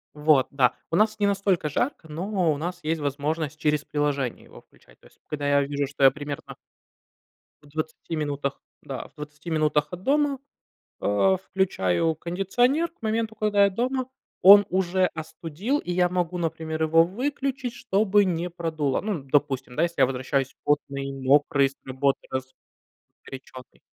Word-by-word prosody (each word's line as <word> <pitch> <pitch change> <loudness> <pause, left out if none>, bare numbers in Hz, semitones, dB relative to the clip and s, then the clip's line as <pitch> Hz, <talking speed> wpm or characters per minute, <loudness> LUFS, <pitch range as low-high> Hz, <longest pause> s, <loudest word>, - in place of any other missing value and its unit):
Вот. 150 -3 +4
Да, 135 -3 +2 0.2
у - - +1
нас 215 +2 +2
не 205 - +3
настолько 195 -5 +1
жарко, 165 - -2
но 175 +1 0
у - - -3
нас 175 +3 -4
есть 160 +1 -1
возможность 150 +2 -2
через 150 -2 +1
приложение 145 -4 -2
его - - -15
включать. - - -24
То - - -18
есть, - - -27
когда 145 -1 -4
я 145 0 +4
вижу, 140 0 -2
что 140 0 +1
я 135 - +10
примерно 145 0 -7 1.1
В 145 - -18
20 155 +2 -5
минутах, 145 -2 -3 0.2
да, 135 -2 -6
в - - -30
20 150 +2 -9
минутах 155 -1 +1
от 180 +1 -7
дома, 285 -1 +2 0.6
а, 190 - +3
включаю 165 - 0
кондиционер. 245 - +1
К - - -41
моменту, 220 0 -1
когда 210 -1 +3
я 200 - +3
дома, 255 +5 -1 0.4
он 200 +2 +10
уже 185 0 +2
остудил, 165 - -3
и 180 - -4
я 180 0 +3
могу, 180 0 -1
например, 160 -1 -3
его 165 +1 +5
выключить, 260 +5 -3
чтобы 205 -3 +2
не 175 -1 -1
продуло. 160 -5 -1
Ну, 215 - -2
н 140 -8 -6
допустим, 135 -3 0
да, 155 - +2
если 170 0 -1
я - - +7
возвращаюсь 135 +1 -2
потный, 140 -2 -1
мокрый 140 +1 +3
с 135 - -17
работы, 135 +1 0 0.7
разгорячённый. 130 -1 -13
160 Hz, 165 wpm, -25 LUFS, 145-195 Hz, 1.1 s, я